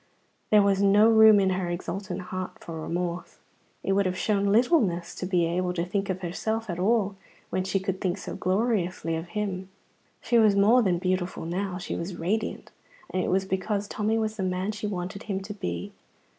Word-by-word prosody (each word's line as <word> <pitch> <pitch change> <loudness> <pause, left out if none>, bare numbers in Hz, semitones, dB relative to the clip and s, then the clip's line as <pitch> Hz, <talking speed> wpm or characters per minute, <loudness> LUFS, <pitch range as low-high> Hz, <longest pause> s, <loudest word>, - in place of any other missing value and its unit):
There 210 -1 +6
was 200 -1 +2
no 205 +2 +6
room 220 -1 +8
in 190 -1 +2
her 185 -1 -1
exultant 185 +2 -4
heart 185 0 -5
for 165 -1 -6
remorse. 175 +2 -3 0.5
It - - 0
would 195 0 +3
have 185 0 -2
shown 200 +1 +1
littleness 210 - +2
to 180 - -5
be 180 -2 +2
able 180 +2 -1
to 170 -1 -1
think 195 +2 -2
of 185 0 -2
herself 220 +4 -2
at 170 - -5
all 205 0 +1 0.3
when 185 - 0
she 195 +1 0
could 190 0 -3
think 185 0 0
so - - -6
gloriously 185 -4 0
of 165 +2 -5
him. 190 -1 -3 0.5
She 235 +1 +2
was 215 -3 +5
more 215 +5 +5
than 185 -6 +2
beautiful 185 -1 -2
now; 180 +2 -2
she 180 - -4
was 175 +2 -4
radiant; 200 +7 -2 0.4
and 185 0 0
it - - -1
was 190 +1 +1
because 200 +2 -2
Tommy 215 +2 0
was 220 -1 -2
the 195 - -2
man 185 +2 -1
she 210 0 -4
wanted 195 +1 -4
him 195 -1 0
to 200 +2 -6
be. 85 - -4
190 Hz, 200 wpm, -27 LUFS, 180-210 Hz, 0.5 s, room